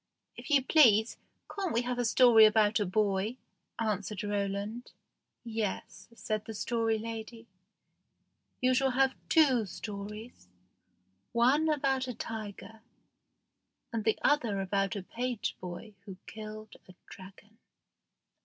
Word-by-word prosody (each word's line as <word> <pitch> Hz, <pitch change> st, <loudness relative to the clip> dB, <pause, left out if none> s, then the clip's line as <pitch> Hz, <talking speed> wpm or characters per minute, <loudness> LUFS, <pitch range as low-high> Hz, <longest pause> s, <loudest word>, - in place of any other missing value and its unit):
"If -, -, -10 dB
you 285 Hz, -3 st, +4 dB
please, 235 Hz, -7 st, +5 dB, 0.4 s
can't 390 Hz, -4 st, -2 dB
we 235 Hz, +2 st, +1 dB
have 245 Hz, 0 st, -3 dB
a 245 Hz, -, +1 dB
story 230 Hz, -1 st, +7 dB
about 215 Hz, 0 st, +3 dB
a 205 Hz, -, 0 dB
boy?" 205 Hz, +3 st, 0 dB, 0.4 s
answered 210 Hz, -2 st, -2 dB
Roland. 205 Hz, +3 st, -3 dB, 0.5 s
"Yes," 215 Hz, -4 st, -4 dB
said 215 Hz, -2 st, -3 dB
the 220 Hz, -, -7 dB
Story 225 Hz, 0 st, 0 dB
Lady; 225 Hz, +1 st, -7 dB, 1.2 s
"you 255 Hz, 0 st, +3 dB
shall 265 Hz, +1 st, +2 dB
have 265 Hz, +1 st, +2 dB, 0.2 s
two 265 Hz, -, +4 dB
stories 210 Hz, -, -8 dB, 0.9 s
one 270 Hz, +7 st, +3 dB
about 270 Hz, -3 st, 0 dB
a 250 Hz, -, -5 dB
tiger, 220 Hz, 0 st, -7 dB, 1.1 s
and 225 Hz, -2 st, -1 dB
the 220 Hz, -, +2 dB
other 235 Hz, -9 st, +2 dB
about 195 Hz, 0 st, -1 dB
a 200 Hz, -, -5 dB
page 245 Hz, +2 st, -3 dB
boy 185 Hz, +4 st, -8 dB
who 190 Hz, -2 st, -9 dB
killed 215 Hz, 0 st, -9 dB
a 185 Hz, -, -15 dB
dragon." 200 Hz, +3 st, -14 dB
220 Hz, 125 wpm, -30 LUFS, 205-245 Hz, 1.2 s, story